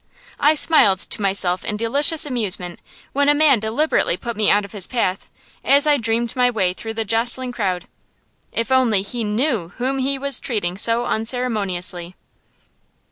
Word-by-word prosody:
I 300 +2 +4
smiled 275 - +4
to 205 - -2
myself 190 -2 0
in 210 - -3
delicious 285 +8 +2
amusement 195 -9 -3 0.3
when 285 +1 +2
a 290 - +4
man 290 -5 +4
deliberately 220 - 0
put 235 +3 -6
me 215 0 +1
out 205 0 +3
of 200 - -13
his 200 -4 -2
path, 195 -7 -2 0.3
as 280 +1 +5
I 295 -1 +3
dreamed 230 -1 -2
my 250 -1 +2
way 190 -6 0
through 225 +4 -7
the 225 0 -2
jostling 240 +4 0
crowd; 190 -7 -3 0.6
if 230 +2 -2
he - - +1
only 230 -7 +2 0.2
knew 215 - -1
whom 265 +2 -2
he 270 +1 0
was 280 -1 0
treating 195 -8 -3
so 230 +4 +1
unceremoniously! 200 -7 -1
230 Hz, 165 wpm, -20 LUFS, 200-260 Hz, 0.6 s, as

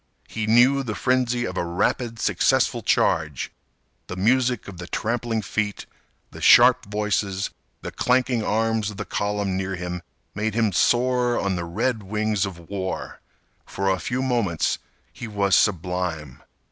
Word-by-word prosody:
He 110 -1 -4
knew 125 +5 +5
the 110 -5 -4
frenzy 125 -1 +1
of 95 -3 -5
a - - 0
rapid 110 +7 -1
successful - - +1
charge. 75 -5 +1 0.6
The 90 - -6
music 125 +4 +1
of 95 -3 -9
the 85 - -7
trampling 115 0 -2
feet, 105 0 -2 0.5
the - - -11
sharp 125 +1 +7
voices, 105 -2 -1 0.3
the - - -5
clanking 125 -2 +1
arms 110 0 0
of 105 - -9
the 105 - -4
column 100 -2 -2
near 95 0 -2
him 90 0 -5 0.3
made 110 0 -2
him 110 -3 +2
soar 125 +4 +2
on 100 -1 -1
the 85 -1 -3
red 110 +7 -1
wings 105 0 -1
of 85 -3 -10
war. 95 -2 -4 0.5
For 95 0 -1
a 95 - 0
few 125 +9 -2
moments 115 -11 0 0.3
he 120 - -7
was 100 -3 +2
sublime. 90 -7 -1
105 Hz, 150 wpm, -23 LUFS, 95-120 Hz, 0.6 s, sharp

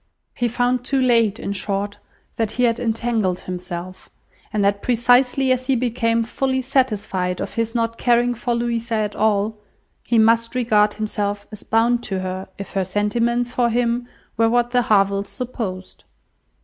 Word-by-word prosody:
He 245 - 0
found 245 +1 0
too 270 +2 0
late, 230 -5 +3
in 200 - -3
short, 200 +1 -3 0.4
that 225 -2 0
he 250 - 0
had 235 -1 +2
entangled 225 -5 -1
himself; 180 0 -7 0.4
and 210 -2 0
that 200 0 +1
precisely 250 +2 +3
as 255 0 0
he 270 - +3
became 230 -1 +1
fully 260 +3 -1
satisfied 210 -9 0
of - - -4
his 230 0 -2
not 230 0 -1
caring 245 0 +3
for 240 0 -2
Louisa 235 -1 -1
at 210 -1 -1
all, 215 0 +1 0.4
he 235 - +1
must 230 +1 +3
regard 215 -4 +3
himself 205 -1 -2
as 210 - -9
bound 235 +2 +2
to 190 -2 -2
her, 185 0 -4
if 200 - -7
her 195 - 0
sentiments 230 +5 0
for 245 -1 +1
him 240 +1 0 0.3
were 225 0 +4
what 240 +1 +1
the 250 0 +3
Harvilles 200 -2 +2
supposed. 225 -8 -6
230 Hz, 160 wpm, -21 LUFS, 205-245 Hz, 0.4 s, were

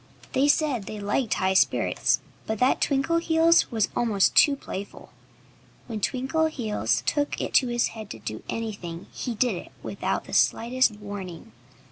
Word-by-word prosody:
They 270 +2 +3
said 285 -8 +1
they 215 - -6
liked 210 +4 0
high 190 0 +1
spirits, 190 - +2 0.3
but 220 - -1
that 250 +4 +2
Twinkleheels 330 +3 +3
was 225 -4 +1
almost 215 -5 +2
too 285 -2 +6
playful. 200 -7 -8 0.7
When 225 -3 -5
Twinkleheels 250 - 0
took 290 - 0
it - - -1
into 255 - +3
his 240 0 +1
head 220 -2 -9
to - - -7
do 110 0 -6
anything 200 -6 -5
he 245 -3 -4
did 235 -1 +1
it - - -10
without - - -2
the - - -11
slightest 245 0 +3
warning. 200 -5 -8
230 Hz, 150 wpm, -26 LUFS, 200-270 Hz, 0.7 s, too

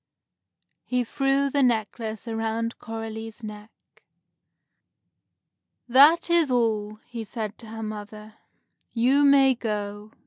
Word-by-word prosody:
He 250 0 0
threw 275 +3 0
the 285 - +1
necklace 225 -2 -1
around 225 +1 -2
Coralie's 225 0 -7
neck. 210 0 -8 2.2
"That 285 +7 +6
is 340 -4 +3
all," 220 -4 0
he 235 -2 -6
said 215 -1 -5
to 230 - -10
her 225 0 -7
mother. 215 0 -8 0.6
"You 255 +5 +3
may 275 -1 +6
go. 210 -2 -5
225 Hz, 105 wpm, -25 LUFS, 215-255 Hz, 2.2 s, That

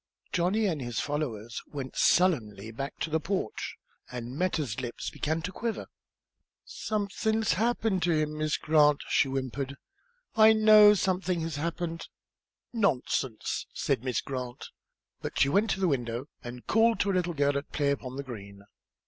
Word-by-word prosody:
Johnny 190 +5 +1
and 165 -8 -1
his 120 -4 -3
followers 120 -7 -3
went 135 -3 -6
sullenly 115 - +2
back 135 +5 -5
to 160 - -3
the 160 - +2
porch, 185 - -3 0.4
and 125 0 -6
Meta's 150 - -1
lip 120 -2 -5 0.2
began 160 +2 -2
to 185 - -3
quiver. 230 +2 -3 0.8
"Somethin's 220 -1 -1
happened 220 0 +1
to 175 - +2
him, 155 -1 0
Miss 155 0 0
Grant," 150 -2 +4
she - - +3
whimpered; 135 +1 -3 0.6
"I 220 0 +8
know 215 -1 +8
somethin' 185 -2 0
has 160 -2 -3
happened!" 165 +1 -3 0.7
"Nonsense," 135 - 0
said 110 - 0
Miss 130 -1 0
Grant. 125 -2 -6 0.5
But - - -4
she 140 - +5
went 205 +9 +2
to 195 - 0
the 190 - +2
window 120 -4 -1 0.2
and 120 0 -8
called 225 +1 +3
to 200 - +1
a - - -1
little 180 -2 0
girl 145 0 +2
at 140 +1 -4
play 145 -2 +1
upon 130 -2 -4
the 140 - -4
green. 100 -6 -9
155 Hz, 155 wpm, -29 LUFS, 130-190 Hz, 0.8 s, I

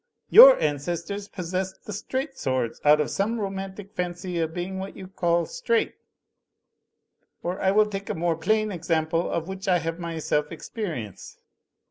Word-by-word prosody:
Your - - +10
ancestors 170 +7 -2
possessed 185 +1 -4
the 210 - -6
straight 265 +7 -3
swords 130 - -2
out 150 +1 +6
of 150 - 0
some 225 +4 -1
romantic 195 0 -5
fancy 175 -1 -3
of 160 -1 -1
being 180 +3 -4
what 195 +1 -7
you 190 - -8
call 170 -2 +1
straight; 475 -2 0 1.5
or, 180 +2 -3
I 190 - +3
will 210 +2 +5
take 200 -1 -6
a 215 - -1
more 170 0 0
plain 215 +5 +1
ex 175 -2 -8
ample, 165 +1 +1
of 165 0 -2
which 190 0 -6
I 180 -2 +4
have 165 +1 -4
myself 160 -3 -2
experience. 160 - -6
185 Hz, 160 wpm, -25 LUFS, 165-200 Hz, 1.5 s, Your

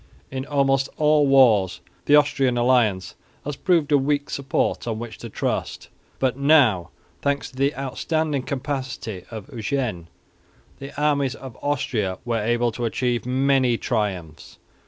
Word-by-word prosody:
In 130 +1 -4
almost 135 -1 +1
all 150 -1 +4
wars 115 -9 +4 0.3
the 145 - +6
Austrian 140 -4 +3
alliance 120 -7 +2 0.3
has 145 0 -3
proved 165 -4 +1
a 145 - +5
weak 145 +1 -1
support 140 -3 -1
on 110 -2 -2
which 115 -1 -7
to 115 - -7
trust; - - -3 0.3
but 130 -2 0
now, 135 - +4 0.3
thanks 140 0 -1
to - - -19
the 140 +2 +1
outstanding 145 +2 -1
capacity 130 -8 -4
of 110 0 -8
Eugene, 115 - -2 0.7
the 140 +1 -8
armies 140 -3 +1
of 130 -4 -10
Austria 130 -10 -1
were 115 -2 0
able 120 +2 +1
to 120 +2 -4
achieve 120 +1 -1
many 130 -2 +2
triumphs. 95 -11 -3
130 Hz, 140 wpm, -23 LUFS, 115-140 Hz, 0.7 s, the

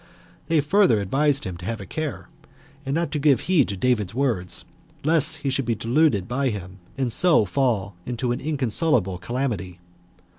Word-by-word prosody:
They 160 -2 +3
further 150 - +3
advised 135 +8 +1
him 90 -4 -5
to 90 - -10
have 115 +2 -3
a 100 - -8
care, 155 - -5 0.6
and 135 - -1
not 165 -3 -1
to 150 - -2
give 140 -4 +3
heed 175 -8 +2
to 100 - -4
David's 110 -3 0
words, 95 -11 0 0.4
lest 160 +1 +2
he 135 - +1
should 135 0 -1
be 115 -1 0
deluded 115 - +1
by 135 +2 0
him, 95 -3 -7 0.2
and 130 -4 0
so 170 -11 +5
fall 105 -4 0
into 120 +2 -2
an 120 - -3
inconsolable 125 - 0
calamity. 105 -7 -3
125 Hz, 175 wpm, -23 LUFS, 100-145 Hz, 0.6 s, so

